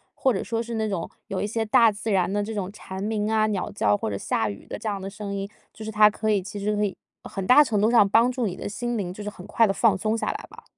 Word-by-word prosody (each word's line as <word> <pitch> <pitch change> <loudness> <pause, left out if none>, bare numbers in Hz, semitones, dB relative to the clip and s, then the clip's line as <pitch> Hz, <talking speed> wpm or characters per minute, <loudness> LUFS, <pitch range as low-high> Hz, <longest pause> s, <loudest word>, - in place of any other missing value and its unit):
或 260 - +2
者 190 - -2
说 230 0 -2
是 235 0 -6
那 220 -1 -1
种 185 -5 -3 0.2
有 190 - -3
一 - - -1
些 225 +2 -1
大 230 0 +5
自 210 +1 -4
然 190 -1 +2
的 205 - +1
这 220 - -5
种 195 -2 -3
蝉 190 -2 -7
鸣 210 0 -1
啊、 220 -1 +3
鸟 205 -4 -2
叫 105 - +2
或 - - -3
者 100 - -3
下 110 +2 -1
雨 100 - -9
的 - - -7
这 220 - -3
样 200 -2 -3
的 190 - -6
声 200 0 -6
音， 195 0 -3 0.2
就 220 - -10
是 220 - -4
它 210 0 +6
可 215 +1 -1
以 200 -2 +2
其 205 +2 -7
实 210 +1 0
可 210 - 0
以 200 -2 -2 0.3
很 195 - -5
大 255 +8 +8
程 220 -7 0
度 220 +3 +3
上 210 -5 +5
帮 230 +4 +4
助 245 -4 -1
你 180 - -4
的 - - -6
心 240 +3 -3
灵， 180 -3 -3
就 205 +2 -8
是 210 - -3
很 185 -3 -12
快 225 +1 +3
地 195 - 0
放 215 -1 +3
松 215 +4 -1
下 - - -2
来 - - -7
吧。 - - -14
210 Hz, 335 characters per minute, -25 LUFS, 195-220 Hz, 0.3 s, 大